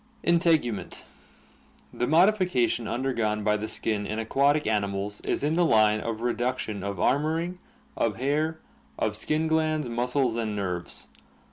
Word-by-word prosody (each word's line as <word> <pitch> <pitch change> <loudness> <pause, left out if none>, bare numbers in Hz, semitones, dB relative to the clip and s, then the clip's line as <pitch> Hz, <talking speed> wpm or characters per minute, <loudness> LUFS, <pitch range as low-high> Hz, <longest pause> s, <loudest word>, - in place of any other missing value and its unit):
Integument. 165 - +1 0.5
— - - -31
The 125 - +2
modification 170 - +3
undergone 115 -3 -1
by 105 0 +2
the 105 +1 -3
skin 110 -2 -2
in 110 - -3
aquatic 140 +6 +2
animals 100 -1 -2
is - - -2
in 150 +2 +1
the 175 +2 +3
line 110 -7 +4
of 115 0 -4
reduction 120 -4 -2
of 100 0 -4
armoring, 160 - 0 0.4
of 110 -3 0
hair, 150 +6 0 0.4
of 110 -1 -1
skin 155 +8 -1
glands, 155 -2 +1
muscles, 125 +1 0
and 110 -2 -2
nerves. 90 -4 -4
120 Hz, 140 wpm, -26 LUFS, 105-155 Hz, 0.5 s, line